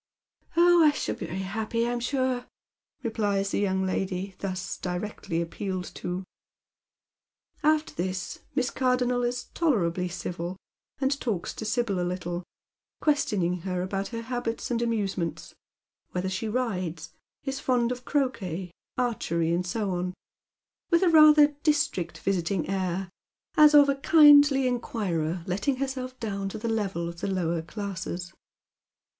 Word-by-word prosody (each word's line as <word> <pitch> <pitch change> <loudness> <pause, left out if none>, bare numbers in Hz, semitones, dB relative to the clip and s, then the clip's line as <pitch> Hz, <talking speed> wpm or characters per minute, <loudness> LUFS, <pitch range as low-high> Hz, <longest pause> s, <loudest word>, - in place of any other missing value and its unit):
" - - -28
Oh, 345 0 +7
I 305 - +7
shall - - -2
be - - -6
very 190 +2 -4
happy, 220 +4 -1
I'm 240 0 -1
sure," 255 0 -1 0.6
replies 205 -4 0
the - - 0
young 190 -2 +1
lady 190 +1 -2
thus 185 -1 -3
directly 180 -2 -3
appealed 185 +2 -4
to. 180 +1 -3 1.4
After 310 +1 +2
this 185 +1 -3 0.2
Miss 260 -3 +1
Cardonnel 250 -1 +1
is 245 +1 -1
tolerably 180 - +1
civil, 175 0 -5 0.4
and 275 +1 +1
talks 205 -8 -2
to 220 - -6
Sibyl 215 -3 0
a - - 0
little, 175 0 -3 0.6
questioning 200 - +1
her 180 0 -3
about 195 +1 -2
her 230 -1 -5
habits 240 0 -3
and 235 -1 0
amusements,— 200 -7 -2 0.6
whether 185 +1 -1
she 190 +4 -2
rides, 185 -9 -2 0.3
is 270 0 -3
fond 245 -3 +1
of 250 0 -5
croquet, 195 - -1 0.3
archery, 170 -9 0
and 180 +1 0
so 205 +2 -1
on, 180 0 -2 0.7
with 340 +1 +4
rather 305 -3 +8
a 295 - -4
district 295 - +1
visiting 185 -2 -1
air, 190 0 -1 0.5
as 300 -2 +7
of 290 -1 +8
a 280 - +3
kindly 290 -2 +7
inquirer 185 -9 -1
letting 205 +10 0
herself 255 -1 -4
down 200 -3 -3
to 205 - -6
the 225 +2 -4
level 195 -6 -1
of 170 0 -8
the - - -1
lower 170 -3 0
classes. 180 -1 -5
205 Hz, 140 wpm, -27 LUFS, 180-255 Hz, 1.4 s, rather